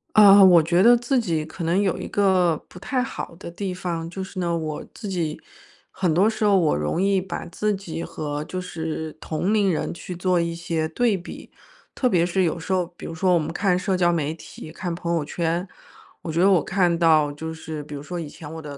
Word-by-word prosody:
啊， 205 Hz, -1 st, +9 dB
我 180 Hz, -4 st, +8 dB
觉 175 Hz, +3 st, +2 dB
得 240 Hz, +3 st, +7 dB
自 245 Hz, +2 st, +1 dB
己 165 Hz, -9 st, -1 dB
可 160 Hz, +2 st, -6 dB
能 170 Hz, +4 st, +2 dB
有 195 Hz, -3 st, 0 dB
一 -, -, -5 dB
个 185 Hz, -4 st, +3 dB
不 180 Hz, -, -12 dB
太 255 Hz, +6 st, -1 dB
好 210 Hz, -8 st, -6 dB
的 170 Hz, -, -8 dB
地 190 Hz, +1 st, -4 dB
方， 170 Hz, -2 st, -4 dB
就 190 Hz, +2 st, -5 dB
是 190 Hz, 0 st, -7 dB
呢， 170 Hz, -1 st, 0 dB
我 155 Hz, -2 st, -4 dB
自 210 Hz, -3 st, -7 dB
己 165 Hz, -5 st, -2 dB, 0.5 s
很 175 Hz, -4 st, 0 dB
多 195 Hz, +6 st, +4 dB
时 220 Hz, -1 st, -1 dB
候 200 Hz, -2 st, +5 dB
我 165 Hz, -4 st, +3 dB
容 75 Hz, -, -1 dB
易 195 Hz, -1 st, +3 dB
把 185 Hz, -1 st, -5 dB
自 210 Hz, +4 st, -1 dB
己 180 Hz, -4 st, -6 dB
和 150 Hz, -3 st, -4 dB
就 185 Hz, +2 st, -4 dB
是 160 Hz, -2 st, -4 dB
同 175 Hz, +7 st, -1 dB
龄 205 Hz, -3 st, +3 dB
人 155 Hz, -, -2 dB
去 180 Hz, +1 st, -7 dB
做 180 Hz, 0 st, +1 dB
一 170 Hz, 0 st, -1 dB
些 165 Hz, -2 st, -2 dB
对 215 Hz, +5 st, +1 dB
比。 175 Hz, -, -10 dB, 0.4 s
特 255 Hz, -, +1 dB
别 175 Hz, -5 st, +3 dB
是 185 Hz, +2 st, +1 dB
有 170 Hz, -1 st, 0 dB
时 170 Hz, +3 st, -6 dB
候 185 Hz, -2 st, +2 dB
比 -, -, -9 dB
如 -, -, -5 dB
说 180 Hz, +3 st, +2 dB
我 175 Hz, -, +4 dB
们 155 Hz, -, -3 dB
看 180 Hz, +1 st, +1 dB
社 185 Hz, 0 st, 0 dB
交 175 Hz, -1 st, +3 dB
媒 155 Hz, -3 st, 0 dB
体、 160 Hz, -1 st, -11 dB
看 170 Hz, +1 st, -4 dB
朋 170 Hz, 0 st, -3 dB
友 165 Hz, -3 st, 0 dB
圈， 170 Hz, +4 st, -2 dB, 0.5 s
我 160 Hz, -, -5 dB
觉 165 Hz, -, -1 dB
得 190 Hz, +3 st, +5 dB
我 185 Hz, -5 st, +4 dB
看 180 Hz, -3 st, +1 dB
到 155 Hz, -3 st, +4 dB
就 160 Hz, +2 st, -6 dB
是 160 Hz, -1 st, -7 dB
比 150 Hz, -, -10 dB
如 140 Hz, -, -6 dB
说， 175 Hz, +4 st, -6 dB
以 160 Hz, -4 st, -5 dB
前 150 Hz, -1 st, -10 dB
我 160 Hz, -, -7 dB
的 145 Hz, -2 st, -8 dB
175 Hz, 255 characters per minute, -23 LUFS, 160-190 Hz, 0.5 s, 啊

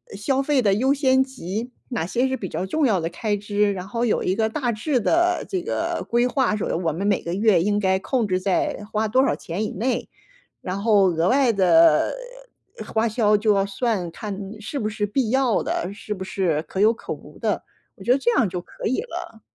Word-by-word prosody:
消 260 Hz, +7 st, 0 dB
费 280 Hz, -1 st, +2 dB
的 200 Hz, -4 st, +3 dB
优 260 Hz, +6 st, +2 dB
先 265 Hz, -2 st, +3 dB
级， 240 Hz, -2 st, -6 dB, 0.2 s
哪 240 Hz, -10 st, -2 dB
些 245 Hz, +8 st, 0 dB
是 265 Hz, -, -1 dB
比 190 Hz, -, -5 dB
较 185 Hz, -, -3 dB
重 295 Hz, +9 st, 0 dB
要 205 Hz, -7 st, +2 dB
的 165 Hz, -, -2 dB
开 205 Hz, +4 st, -2 dB
支， 205 Hz, 0 st, 0 dB
然 185 Hz, -1 st, -6 dB
后 235 Hz, +3 st, -2 dB
有 225 Hz, -, +1 dB
一 185 Hz, -, 0 dB
个 220 Hz, 0 st, +1 dB
大 245 Hz, 0 st, -1 dB
致 250 Hz, +5 st, 0 dB
的 345 Hz, -, +2 dB
这 375 Hz, -2 st, -1 dB
个 335 Hz, 0 st, -2 dB
规 240 Hz, +1 st, +3 dB
划， 255 Hz, -3 st, +1 dB
说 210 Hz, -, -2 dB
我 165 Hz, -2 st, 0 dB
们 185 Hz, +6 st, -2 dB
每 200 Hz, -, +2 dB
个 170 Hz, -, -3 dB
月 200 Hz, -2 st, +3 dB
应 205 Hz, +1 st, +1 dB
该 190 Hz, -2 st, +2 dB
控 235 Hz, +2 st, -1 dB
制 185 Hz, -1 st, 0 dB
在 195 Hz, +2 st, 0 dB
花 220 Hz, 0 st, 0 dB
多 255 Hz, +5 st, +3 dB
少 -, -, +1 dB
钱 175 Hz, +6 st, -4 dB
以 215 Hz, -, -2 dB
内， 245 Hz, +7 st, -2 dB, 0.5 s
然 185 Hz, +2 st, -4 dB
后 205 Hz, -3 st, +4 dB
额 165 Hz, 0 st, 0 dB
外 260 Hz, -2 st, +3 dB
的 170 Hz, -6 st, +4 dB, 0.8 s
花 225 Hz, +1 st, +2 dB
销 215 Hz, -1 st, +3 dB
就 210 Hz, +1 st, +2 dB
要 195 Hz, -1 st, +2 dB
算， 200 Hz, -2 st, -1 dB
看 205 Hz, +3 st, -6 dB, 0.2 s
是 280 Hz, +7 st, -5 dB
不 215 Hz, -5 st, -1 dB
是 210 Hz, -1 st, -2 dB
必 220 Hz, +2 st, -1 dB
要 260 Hz, -3 st, +2 dB
的， 180 Hz, -, -2 dB
是 210 Hz, +1 st, -6 dB
不 190 Hz, -, -7 dB
是 180 Hz, -5 st, -1 dB
可 -, -, -6 dB
有 215 Hz, +2 st, +5 dB
可 230 Hz, -, -7 dB
无 -, -, -11 dB
的。 -, -, -1 dB, 0.3 s
我 -, -, -13 dB
觉 -, -, -2 dB
得 250 Hz, -, +6 dB
这 255 Hz, -3 st, +1 dB
样 215 Hz, -, +3 dB
就 180 Hz, 0 st, -4 dB
可 -, -, -8 dB
以 255 Hz, -, 0 dB
了。 230 Hz, -, -8 dB
215 Hz, 240 characters per minute, -23 LUFS, 195-250 Hz, 0.8 s, 得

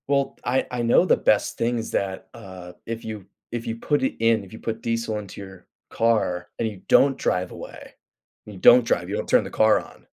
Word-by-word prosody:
Well, 140 Hz, -1 st, 0 dB
I 130 Hz, +2 st, 0 dB
I 125 Hz, -1 st, -2 dB
know 120 Hz, +9 st, +4 dB
the -, -, +3 dB
best 105 Hz, -, +1 dB
thing's 115 Hz, -1 st, -1 dB
that, 95 Hz, -1 st, -3 dB
uh, 95 Hz, -5 st, -11 dB
if 115 Hz, 0 st, -5 dB
you 110 Hz, -4 st, -7 dB, 0.3 s
if 120 Hz, 0 st, -5 dB
you 115 Hz, -, -2 dB
put 145 Hz, +4 st, -1 dB
it 130 Hz, -, 0 dB
in, 115 Hz, -2 st, +2 dB
if 95 Hz, -, -14 dB
you 110 Hz, -, -9 dB
put 115 Hz, 0 st, -4 dB
diesel 115 Hz, -2 st, -2 dB
into 100 Hz, -1 st, -10 dB
your 95 Hz, -2 st, -12 dB, 0.2 s
car 100 Hz, -6 st, 0 dB
and 115 Hz, -, 0 dB
you 100 Hz, -4 st, -8 dB
don't 135 Hz, 0 st, +4 dB
drive 90 Hz, 0 st, -1 dB
away, -, -, -10 dB, 0.5 s
and 105 Hz, -, -10 dB
you -, -, -11 dB
don't 120 Hz, +5 st, +7 dB
drive, -, -, -1 dB
you -, -, -2 dB
don't -, -, -4 dB
turn -, -, +4 dB
the -, -, -7 dB
car 110 Hz, 0 st, +3 dB
on. -, -, -14 dB
115 Hz, 225 wpm, -23 LUFS, 100-115 Hz, 0.5 s, don't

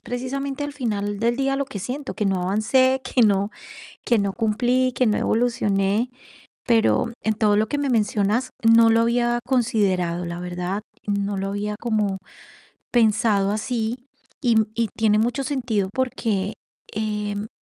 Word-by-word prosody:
precisamente, 270 Hz, +3 st, -4 dB
al 290 Hz, -, -5 dB
final 205 Hz, -6 st, -2 dB
del 235 Hz, +2 st, +1 dB
día 275 Hz, 0 st, 0 dB
lo 280 Hz, -1 st, -1 dB
que 215 Hz, -, -7 dB
siento, 260 Hz, +8 st, -5 dB
que 210 Hz, -, -2 dB
no 190 Hz, -2 st, 0 dB
avancé, 255 Hz, +8 st, +2 dB
que 255 Hz, -, 0 dB
no 200 Hz, -1 st, +3 dB, 0.6 s
que 235 Hz, -3 st, +3 dB
no 200 Hz, -1 st, -1 dB
cumplí, 245 Hz, +3 st, +1 dB
que 255 Hz, -, +1 dB
no 210 Hz, -, +2 dB
evolucioné. 215 Hz, -1 st, +1 dB, 0.6 s
Pero, 230 Hz, 0 st, +2 dB
en 220 Hz, -, +1 dB
todo 210 Hz, -1 st, +2 dB
lo 215 Hz, +1 st, +2 dB
que 290 Hz, -, -2 dB
me 285 Hz, -1 st, -1 dB
mencionas, 220 Hz, +1 st, +1 dB
no 230 Hz, 0 st, +6 dB
lo 225 Hz, 0 st, +4 dB
había 240 Hz, +1 st, +1 dB
considerado, 200 Hz, -9 st, +1 dB
la 170 Hz, 0 st, -5 dB
verdad, 180 Hz, +3 st, -3 dB, 0.2 s
no 200 Hz, -1 st, -1 dB
lo 195 Hz, +1 st, -2 dB
había 205 Hz, +1 st, -3 dB
como 215 Hz, -4 st, 0 dB, 0.7 s
pensado 215 Hz, -3 st, +3 dB
así. 225 Hz, +2 st, -2 dB, 0.4 s
Y 240 Hz, -4 st, +3 dB, 0.2 s
y 230 Hz, 0 st, 0 dB
tiene 215 Hz, -1 st, +3 dB
mucho 240 Hz, +4 st, 0 dB
sentido. 245 Hz, -8 st, -1 dB
porque, 225 Hz, -6 st, -1 dB, 0.4 s
em, 210 Hz, -1 st, -3 dB
220 Hz, 155 wpm, -23 LUFS, 205-245 Hz, 0.7 s, no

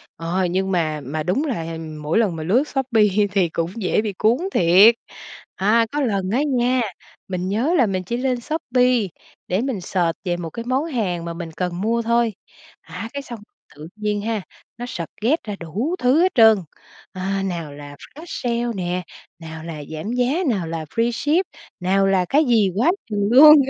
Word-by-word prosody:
ờ, 175 Hz, +3 st, -1 dB
nhưng 190 Hz, +2 st, -1 dB
mà 155 Hz, -4 st, 0 dB
mà 155 Hz, +4 st, -3 dB
đúng 185 Hz, -, 0 dB
là 165 Hz, -, -3 dB, 0.2 s
mỗi 150 Hz, +5 st, 0 dB
lần 200 Hz, -7 st, +1 dB
mà 160 Hz, -, -5 dB
lướt 215 Hz, -, +3 dB
Shopee 255 Hz, -6 st, +1 dB, 0.3 s
thì 185 Hz, -4 st, +2 dB
cũng 165 Hz, +1 st, -2 dB
dễ 210 Hz, -2 st, +1 dB
bị 215 Hz, -2 st, -3 dB
cuốn 220 Hz, +6 st, +2 dB, 0.2 s
thiệt! 185 Hz, +7 st, +6 dB, 0.6 s
À, 225 Hz, +4 st, +3 dB
có 295 Hz, +1 st, -1 dB
lần 200 Hz, -7 st, 0 dB
á 250 Hz, +8 st, +1 dB
nha, 255 Hz, -3 st, +1 dB, 0.5 s
mình 185 Hz, 0 st, -3 dB
nhớ 245 Hz, -, +1 dB
là 250 Hz, -, +5 dB
mình 185 Hz, -2 st, -2 dB
chỉ 235 Hz, +7 st, -3 dB
lên 250 Hz, -1 st, -1 dB
Shopee 250 Hz, -6 st, +1 dB, 0.4 s
để 185 Hz, +5 st, 0 dB
mình 255 Hz, -7 st, -2 dB
search 175 Hz, -2 st, -1 dB
về 175 Hz, -2 st, -1 dB
một 165 Hz, -2 st, -5 dB
cái 230 Hz, +7 st, -7 dB
món 260 Hz, +5 st, 0 dB
hàng 195 Hz, -, -2 dB
mà 170 Hz, -, -4 dB
mình 170 Hz, -1 st, -7 dB
cần 180 Hz, +2 st, -3 dB
mua 230 Hz, +3 st, +1 dB
thôi, 235 Hz, -1 st, +1 dB, 0.5 s
à, 180 Hz, +7 st, -7 dB
cái 280 Hz, -, -3 dB
xong 240 Hz, -4 st, -9 dB, 0.4 s
tự 150 Hz, +2 st, -9 dB
nhiên 210 Hz, -1 st, -2 dB
ha, 220 Hz, 0 st, -2 dB, 0.4 s
nó 245 Hz, -, -5 dB
suggest 230 Hz, -, -2 dB
ra 210 Hz, -2 st, -5 dB
đủ 215 Hz, -, -2 dB
thứ 255 Hz, +6 st, +4 dB
hết 370 Hz, +1 st, +3 dB
trơn, 220 Hz, -2 st, +7 dB, 0.5 s
à, 195 Hz, +1 st, -2 dB
nào 170 Hz, -6 st, -4 dB
là 145 Hz, 0 st, -10 dB
flash 305 Hz, -, -13 dB
sale 240 Hz, -5 st, -2 dB
nè, 180 Hz, -1 st, -2 dB, 0.4 s
nào 160 Hz, -1 st, -8 dB
là 160 Hz, -3 st, -6 dB
giảm 160 Hz, +8 st, -4 dB
giá, 250 Hz, +8 st, +1 dB
nào 190 Hz, -7 st, -1 dB
là 160 Hz, -1 st, -4 dB
freeship, 240 Hz, -, +1 dB, 0.4 s
nào 195 Hz, +2 st, +2 dB
là 190 Hz, -2 st, +2 dB
cái 300 Hz, +3 st, +4 dB
gì 225 Hz, -6 st, +3 dB
quá 250 Hz, -, +3 dB, 0.2 s
chừng 205 Hz, -1 st, 0 dB
luôn. 300 Hz, +5 st, +10 dB
210 Hz, 190 wpm, -21 LUFS, 175-245 Hz, 0.6 s, luôn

